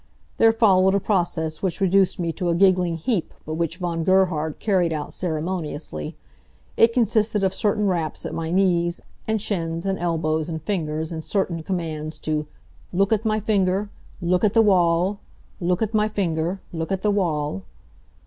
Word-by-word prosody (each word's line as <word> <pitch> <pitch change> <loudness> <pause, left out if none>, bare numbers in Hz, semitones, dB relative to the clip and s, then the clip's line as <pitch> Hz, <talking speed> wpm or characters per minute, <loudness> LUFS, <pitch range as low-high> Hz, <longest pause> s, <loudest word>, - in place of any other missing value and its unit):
There 225 - +7
followed 195 -4 +4
a - - +3
process 170 -6 -1
which 190 -1 -2
reduced 195 0 +3
me 170 -2 -1
to 175 +1 -2
a 170 - +2
giggling 180 -2 +3
heap 175 +2 -1
but 155 - -4
which 165 +1 -2
Von 170 -2 -2
Gerhard 170 -4 +2
carried 185 -6 +1
out 150 -2 -4
ceremoniously. 155 - -4 0.6
It 230 - +5
consisted 220 -3 +1
of 190 -1 +2
certain 210 +1 0
raps 170 -5 -1
at - - -4
my 160 0 -3
knees, 175 -1 +1 0.3
and 220 0 +1
shins, 170 -4 -3
and 195 -1 -1
elbows, 160 -2 0
and 160 -1 -3
fingers, 160 -4 -2
and 160 -1 -5
certain 180 -4 -1
commands 155 -3 -4
to 150 -1 -2 0.4
"look 195 +4 +2
at 220 +1 -1
my 215 0 +2
finger! 200 -1 +1 0.3
Look 180 +1 +1
at 210 0 +2
the 225 - +6
wall! 185 0 +3 0.4
Look 180 +2 +1
at 220 +1 -3
my 215 0 +3
finger! 180 -3 -1
Look 165 +2 -3
at 190 -1 -1
the 210 - +3
wall!" 150 - -1
180 Hz, 170 wpm, -23 LUFS, 165-200 Hz, 0.6 s, There